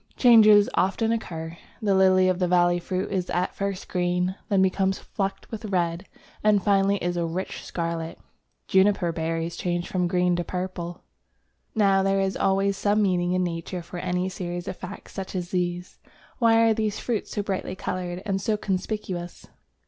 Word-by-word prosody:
Changes 215 -4 +7
often 220 +4 +1
occur. 165 -7 -4 0.2
The 210 -4 +1
Lily 185 -1 +5
of 185 -1 +1
the 180 - +2
Valley 175 0 +3
fruit 185 +2 -3
is 185 -2 -1
at 180 +1 -1
first 195 -1 -3
green, 180 0 0 0.2
then 195 -2 +4
becomes 190 0 +1
flecked 195 -2 -4
with 220 -1 -6
red, 180 -2 -1 0.4
and 210 -2 +4
finally 200 0 +3
is 175 -1 -2
a 170 - 0
rich 180 +3 -4
scarlet. 165 -1 -4 0.5
Juniper 190 -3 +3
berries 165 0 -2
change 175 0 -2
from 180 -1 0
green 180 0 +2
to 175 - -1
purple. 180 -1 -5 0.7
Now 195 -3 +4
there 195 0 +2
is 195 0 0
always 195 +1 +1
some 210 +1 +2
meaning 180 -2 +1
in 185 0 +1
Nature 170 +1 -4
for 175 +1 -7
any 180 0 -1
series 175 -2 -5
of - - -3
facts 185 +3 -9
such 195 -1 -6
as 180 -1 -3
these. 180 0 -2 0.4
Why 230 -1 +5
are 225 - +4
these 215 -2 -1
fruits 235 -4 -2
so 205 - -2
brightly 190 -2 -3
coloured 180 0 -4
and 195 -2 -1
so 215 +1 0
conspicuous? 185 -3 -4
185 Hz, 170 wpm, -25 LUFS, 175-200 Hz, 0.7 s, Changes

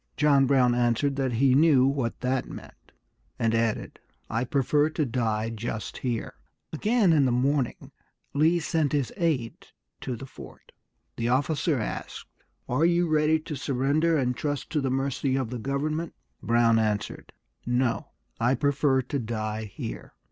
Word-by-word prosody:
John 140 -3 +4
Brown 130 -3 +4
answered 120 +3 +1
that 130 -3 0
he 130 +3 +3
knew 140 -2 +5
what 135 -4 -1
that 130 +1 -1
meant, - - -12 0.5
and 115 0 +1
added, 115 -1 -1 0.3
"I 115 +3 0
prefer 145 +4 +2
to 155 -1 -1
die 115 -3 -1
just 110 -1 -5
here." 120 -3 -3 0.4
Again 210 +2 +3
in 145 -3 +4
the 125 - +2
morning 130 +1 0 0.4
Lee 160 +5 +3
sent 160 -3 0
his 140 -4 0
aide 155 - -2 0.3
to 125 - -4
the 125 - -8
fort. - - -13 0.5
The 115 +1 -1
officer 145 +3 +1
asked, 110 - -5 0.4
"Are 130 +6 +1
you 175 +1 +3
ready 155 0 +3
to 155 -1 -6
surrender, 145 +5 +1
and 125 -3 0
trust 145 0 -3
to 155 -3 0
the 135 - -1
mercy 135 0 -1
of 130 -3 -2
the 125 - -4
government?" 150 +6 -2 0.3
Brown 115 -1 +3
answered, 105 -2 -2 0.4
"No, 125 0 0 0.3
I 120 +3 +2
prefer 140 -2 +1
to 140 +3 -3
die 110 -2 -3
here." 75 - -8
135 Hz, 155 wpm, -26 LUFS, 120-150 Hz, 0.5 s, knew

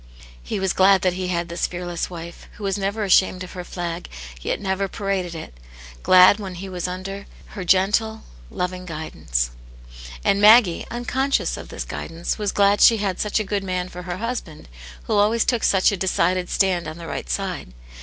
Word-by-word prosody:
He - - -4
was 190 -1 0
glad 190 -1 +5
that 185 -1 +2
he 185 0 -3
had 170 -1 -1
this 170 0 -2
fearless 175 -1 -4
wife, 170 -1 -9
who 210 - -11
was 195 -1 0
never 200 +2 -2
ashamed 185 -1 +3
of 185 - -9
her 180 - -6
flag, 175 -1 -5 0.3
yet - - -2
never 195 0 -1
paraded 190 -3 -3
it; 155 - -8 0.5
glad 185 +2 +7
that 195 -3 -6
he 190 +3 -7
was 180 -1 -4
under 190 +2 -6 0.2
her 190 - -6
gentle, 210 +5 +2 0.3
loving 180 0 -4
guidance. - - -3 0.7
And 200 - +2
Maggie, 210 -4 +6
unconscious 260 +3 -1
of - - -9
this - - -5
guidance, 165 +6 -4
was 205 -2 0
glad 200 0 +3
she 230 - +7
had 195 -3 -2
such 210 +1 0
a - - 0
good 200 -1 -2
man 185 -1 -2
for 180 - -8
her 180 0 -5
husband, 230 -8 -5 0.4
who - - -3
always 215 +3 +3
took 240 -3 0
such 190 +2 +4
a 200 - -2
decided 185 -1 0
stand 185 -4 +1
on 155 +1 -7
the 170 - -9
right - - -5
side - - -3
185 Hz, 190 wpm, -22 LUFS, 175-200 Hz, 0.7 s, glad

